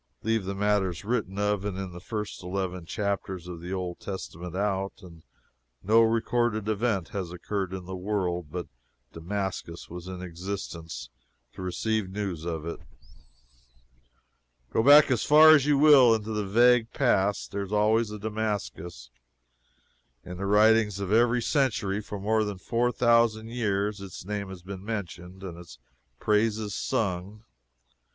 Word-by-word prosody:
Leave 115 -2 0
the 100 +1 -3
matters 100 -3 0
written 105 -4 -2
of 105 -1 0
in 100 -2 -3 0.2
the 90 - -9
first 105 +2 -5
eleven 90 -1 -4
chapters 100 -4 -3
of 85 -2 -7
the 90 +2 -7
Old 90 -2 -4
Testament 90 -3 -7
out, 100 -1 -1
and 85 -3 -13 0.6
no 110 +4 +5
recorded 115 -1 +1
event 105 -4 0
has 95 -4 -4
occurred 95 +1 -3
in 95 -1 -6
the 95 +1 -6
world 90 -3 -2
but 90 0 -4 0.5
Damascus 90 -1 -5
was 90 +1 -8
in 90 -1 -6
existence 85 -7 -6 0.4
to - - -9
receive 105 +4 -1
the 95 +2 -10
news 90 -6 -3
of 80 -2 -4
it. 85 - -5 1.9
Go - - +3
back 145 +3 +7
as 120 -4 +1
far 155 +1 +8
as 150 -3 +5
you 145 -1 +4
will 135 -6 +7
into 110 0 -4
the 105 -2 -2
vague 120 +2 +4
past, 100 -8 +1
there 100 0 -3
was 100 0 -6
always 110 +2 +2
a 105 - -6
Damascus. 105 - -4 1.1
In 90 0 -7
the 100 +1 -3
writings 105 0 +4
of 100 -1 -3
every 120 +2 +3
century 105 -8 0
for 105 -1 -7
more 110 +2 +1
than 105 -2 -4
four 120 +6 0
thousand 115 -2 +3
years, 105 -3 -1
its 95 -2 -9
name 100 -1 -4
has 95 -2 -10
been 95 0 -8
mentioned 95 -3 -6
and 85 -3 -7
its 85 -7 -12 0.4
praises 105 0 +1
sung. 100 +1 -2
100 Hz, 155 wpm, -27 LUFS, 90-110 Hz, 1.9 s, far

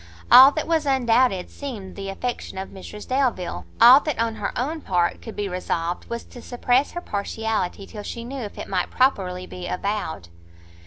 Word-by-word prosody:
All 265 +2 +10
that 310 - -2
was 320 -3 +1
undoubted 245 -7 +2
seemed 225 -10 -7
the 195 -1 -6
affection 240 +1 -4
of 190 - -5
Mrs 210 +2 -10
Delvile, 255 -9 -1
all 245 +4 +9
that, 300 -2 -3
on 225 -1 -1
her 205 - -2
own 305 +6 -2
part, 175 -6 0
could 225 - -9
be 205 -1 -2
resolved, 175 -2 -3
was 235 0 -4
to 245 - -13
suppress 250 +3 +1
her 350 - -4
partiality 205 - -3
till 210 - -9
she 230 +3 -6
knew 265 +2 -6
if 210 -3 -7
it - - -6
might 185 -2 -1
properly 185 -8 +1
be 180 -1 -8
avowed. 180 - -3
225 Hz, 180 wpm, -23 LUFS, 190-255 Hz, -, All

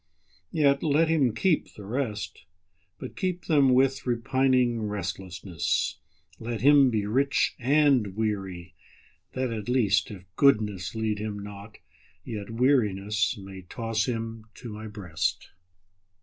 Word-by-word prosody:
Yet 140 -4 +3
let 155 +2 +2
him 145 -7 +3
keep 170 +6 +1
the 105 - -10
rest, 110 - -4 0.5
But - - -8
keep 185 -2 -2
them 140 -5 +4
with 135 0 +2
repining 120 -1 +1
restlessness; 90 -3 -3 0.4
Let 115 -2 -4
him 140 0 +6
be 110 -4 -1
rich 135 +6 +1
and 130 -6 +3
weary, 95 -5 -3 0.6
that 130 -2 -2
at 110 0 -5
least, 105 -6 +2
If 95 -4 -9
goodness 105 -9 +2
lead 110 -2 -1
him 105 -1 -4
not, 100 +1 -9 0.5
yet 105 -3 -5
wearinessMay 100 -6 0
toss 115 -2 -1
him 115 -2 -4
to 120 -4 -8
My 110 +1 -7
breast. 90 -5 -3
110 Hz, 120 wpm, -27 LUFS, 100-130 Hz, 0.6 s, him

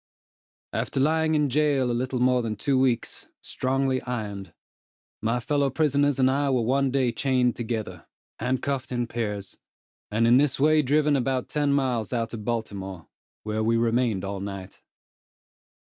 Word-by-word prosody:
After - - -2
lying 160 +2 +2
in 150 -1 +2
jail 140 -2 +2
a - - 0
little 130 +1 -2
more 125 0 +3
than 110 -2 -3
two 130 +5 +1
weeks, 130 -3 -1
strongly 130 0 -1
ironed, 105 -7 -5 0.7
my 115 +2 0
fellow 140 +3 +1
prisoners 145 -1 +2
and 130 -1 +4
I 140 +1 +1
were 125 -3 +1
one 135 +3 +2
day 130 -2 +1
chained 125 0 +1
together, 110 -7 -5 0.3
handcuffed 130 +2 -2
in 120 -1 -1
pairs, 105 -4 -4 0.5
and 110 +2 +1
in 120 +2 +6
this 140 -1 +2
way 155 +2 +4
driven 150 +1 +2
about 130 -1 -1
ten 145 -1 +1
miles 130 -5 0
out 115 -1 -2
of 110 -2 -6
Baltimore, 100 -6 -4 0.3
where 110 0 -2
we 115 +1 +2
remained 115 -4 +1
all 100 0 -4
night. 100 -1 -7
125 Hz, 155 wpm, -25 LUFS, 110-135 Hz, 0.7 s, in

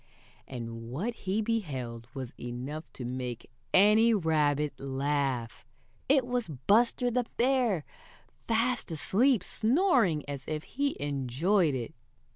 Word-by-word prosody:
And 115 -2 -7
what 185 - -2
he 205 0 -2
beheld 130 - -3
was 130 -3 -6
enough 130 +6 -6
to 125 - -7
make 125 -1 -5 0.2
any 215 +4 +6
rabbit 150 -5 +1
laugh! 135 -3 -1 0.5
It 270 -2 +4
was 245 -1 -1
Buster 220 - +2
the 245 0 0
Bear 240 - +2 0.6
fast 235 +1 +1
asleep, 205 - +2
snoring 225 - +2
as 140 -2 -5
if 155 0 -3
he 280 +1 -2
enjoyed 145 - +1
it. 120 -3 -4
155 Hz, 115 wpm, -29 LUFS, -, 0.6 s, any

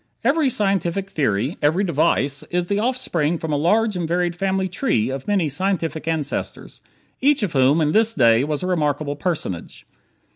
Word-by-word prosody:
Every 280 +3 +2
scientific 195 -3 -1
theory, 130 - -1
every 160 +7 +2
device, 145 -5 +1
is 175 0 -1
the 200 +3 -1
offspring 180 - 0
from 160 -1 -4
a - - +2
large 210 +8 +2
and 175 -2 -2
varied 175 0 0
family 190 +1 -1
tree 170 - 0
of 135 0 -6
many 200 -6 +1
scientific 165 0 -2
ancestors, 155 -3 -4 0.4
each 280 -2 +3
of 190 - -2
whom 135 +4 +3
in 150 -1 +1
his 225 +1 +3
day 115 -2 +4
was 150 +2 -2
a - - -1
remarkable 150 -4 -1
personage. 145 - -4
170 Hz, 170 wpm, -21 LUFS, 145-195 Hz, 0.4 s, day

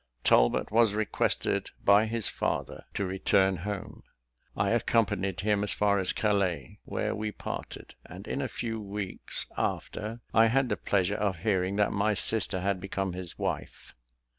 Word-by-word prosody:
Talbot - - +4
was 110 -2 +4
requested 110 -1 0 0.2
by 100 +2 +6
his 115 -2 -1
father - - -3
to 100 - 0
return 95 0 +2
home. 100 +3 -5 0.6
I 100 - +2
accompanied 100 -5 +1
him 105 0 +1
as 105 - 0
far 100 -1 +2
as 95 - +1
Calais, 95 - 0
where - - -2
we 105 0 -3
parted; - - -7
and 95 +4 -11
in 140 - -2
a 130 - -1
few 115 -2 -4
weeks 100 -1 -2
after, 110 +3 -3
I 115 0 +6
had 130 +2 +2
the 105 - +1
pleasure 100 -1 +1
of 100 -4 0
hearing 95 -2 +1
that 105 0 +2
my 105 +1 +1
sister 100 -2 +2
had 95 -1 -1
become 95 -1 -2
his 90 -1 -7
wife. - - -4
100 Hz, 160 wpm, -29 LUFS, 95-110 Hz, 0.6 s, by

